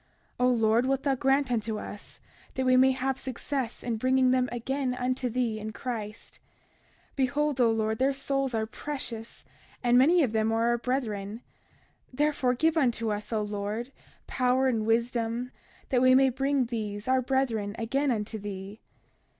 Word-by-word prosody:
31:34 250 - +3
O - - +4
Lord, 230 0 +3
wilt 270 0 0
thou 280 -2 +2
grant 270 0 +1
unto 220 -2 -1
us 205 0 -9 0.4
that 260 - -1
we 255 0 +5
may 260 +1 +6
have 265 0 -1
success 260 -1 -4
in 235 -2 -2
bringing 255 +2 +3
them 255 -1 +2
again 255 +2 -2
unto 255 0 -1
thee 235 -2 -1
in 215 +1 -5
Christ. 215 -2 -6 0.7
31:35 - - -35
Behold, 280 +1 +1
O 235 - +5
Lord, 220 -1 0
their 265 +2 +3
souls 275 -2 -1
are 220 -1 0
precious, 235 -3 -6 0.4
and 245 0 +5
many 330 +6 +5
of 250 - 0
them 220 0 +1
are 225 +1 +2
our 240 0 +1
brethren; 225 -4 -3 0.7
therefore, 265 -2 +1
give 320 +5 +2
unto 235 -6 +1
us, 210 +2 -4
O 215 -2 0
Lord, 210 +4 -4 0.3
power 255 +1 +1
and 225 -4 0
wisdom 235 +1 0 0.4
that 250 -3 +2
we 255 0 +6
may 265 0 +5
bring 270 +1 +1
these, 215 -3 -4
our 260 0 +3
brethren, 235 -6 -1
again 270 +5 0
unto 220 -2 -2
thee. 200 +1 -7
250 Hz, 170 wpm, -28 LUFS, 220-265 Hz, 0.7 s, may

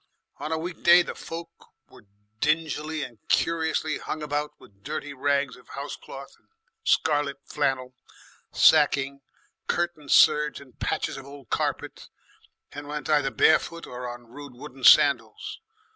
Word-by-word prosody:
On 155 - -5
a 160 - 0
weekday 175 +1 +4
the - - -6
folk 165 0 -8 0.4
were - - -18 0.3
dingily 155 +1 0
and 120 -3 -9
curiously 160 -2 +1
hung 155 - -5
about 150 0 -3
with 100 -1 -20
dirty 145 +1 -5
rags 140 -1 0
of 125 - -19
housecloth 140 -1 -8
and - - -38 0.4
scarlet 145 -3 +1
flannel, 135 -3 -1 0.6
sacking, 140 -3 +4 0.5
curtain 170 -4 -2
serge, 150 0 +5
and 135 -3 -17
patches - - -2
of 135 0 -10
old 140 -3 -13
carpet, - - -3 0.6
and 145 0 -8
went 150 0 -4
either 145 -3 +3
bare 155 - +5
footed 170 0 -9
or 125 0 -5
on 120 0 -9
rude 135 +2 -11
wooden 135 0 -11
sandals. 150 - +4
145 Hz, 140 wpm, -26 LUFS, 135-155 Hz, 0.6 s, serge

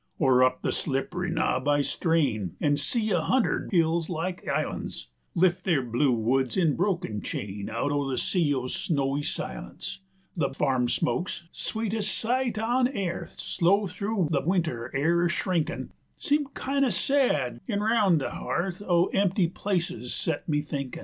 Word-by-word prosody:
Or 130 -4 +4
up 130 0 +1
the - - +1
slippery 175 +6 -1
knob 130 -5 0
I 145 0 +3
strain 135 - 0
An' 145 -1 +2
see 215 - +1
a 175 -4 +2
hundred 255 +8 +1
hills 165 -2 +2
like 175 +2 -3
islan's - - -3 0.3
Lift 175 0 +3
their 160 -8 +2
blue 125 +3 +1
woods 125 +4 +1
in 165 -6 +3
broken 175 - -1
chain 100 0 -5
Out 115 +6 -1
o' 145 -1 0
the 130 - -1
sea 170 -6 +2
o' 130 -3 0
snowy 140 -1 0
silence; 60 - -4 0.3
100 140 -6 -1
The - - -17
farm 130 -4 +2
smokes, 170 +9 -1
sweetes' 220 -1 -2
sight 245 +1 0
on 245 +3 +2
airth, 195 -9 -4
Slow 195 +4 +2
thru 195 0 -1
the 140 -3 +2
winter 160 -8 -1
air 170 +5 +2
a - - +2
shrinkin' 170 -1 -1 0.3
Seem 290 0 +1
kin' 275 +1 0
o' 265 - +3
sad, 170 - +1
an' 205 -3 -1
roun' 210 -5 +3
the 145 - -2
hearth 185 +2 -3
Of 175 -3 +2
empty 195 -1 +2
places 175 - -2
set - - -2
me 150 -1 +2
thinkin'. 140 -3 -5
170 Hz, 165 wpm, -27 LUFS, 135-195 Hz, 0.3 s, Or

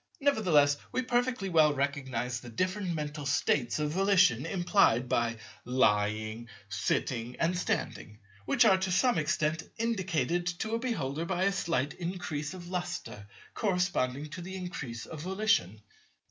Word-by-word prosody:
Nevertheless, 175 - +3
we 255 - 0
perfectly 245 -3 0
well 155 -4 +4
recognize 130 -3 -2
the 120 - -10
different 185 - -1
mental 150 -1 -4
states 130 -2 +1
of 150 -1 -1
volition 185 - +3
implied 175 - +3
by 120 -1 0 0.3
"lying," 110 -2 +1 0.2
"sitting," 115 +5 -1
and 170 +2 +1
"standing," 110 -10 -3 0.3
which - - +4
are 190 -3 +5
to 190 0 -1
some 240 +2 +3
extent 155 +1 0 0.2
indicated 175 - 0
to 185 +6 -2
a 230 - +1
beholder 165 - -2
by 180 +1 -1
a 200 - +3
slight 160 -7 -1
increase 170 -3 -4
of 175 -1 -9
lustre 175 - -5 0.3
corresponding 180 - 0
to 175 - -6
the 190 +2 -7
increase 145 -11 -6
of 155 -2 -8
volition. 185 - +1
160 Hz, 140 wpm, -30 LUFS, 125-190 Hz, 0.3 s, are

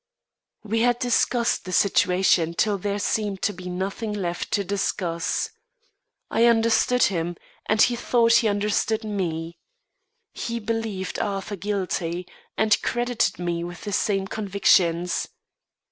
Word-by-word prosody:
We 220 +1 -1
had 240 +1 +3
discussed 240 -1 +1
the 185 - -6
situation 180 -3 +3
till 205 0 +1
there 200 +1 -2
seemed 205 -2 -1
to 205 - +1
be 180 0 -8
nothing 195 +4 -3
left 175 -4 -3
to 200 - +2
discuss. 180 -3 -2 0.8
I 230 - +3
understood 230 +2 +3
him, 175 -2 0 0.3
and 215 - +1
he 245 - +2
thought 235 -1 +3
he 230 - +2
understood 210 +2 0
me. 170 -5 -3 0.7
He 235 0 -4
believed 220 -4 -3
Arthur 200 0 -3
guilty, 180 -3 -3 0.3
and 220 -1 +3
credited 240 -1 0
me 175 -1 -2
with 175 0 -7
the 205 - -5
same 195 -1 +1
convictions. 185 -4 +1
200 Hz, 130 wpm, -24 LUFS, 180-220 Hz, 0.8 s, had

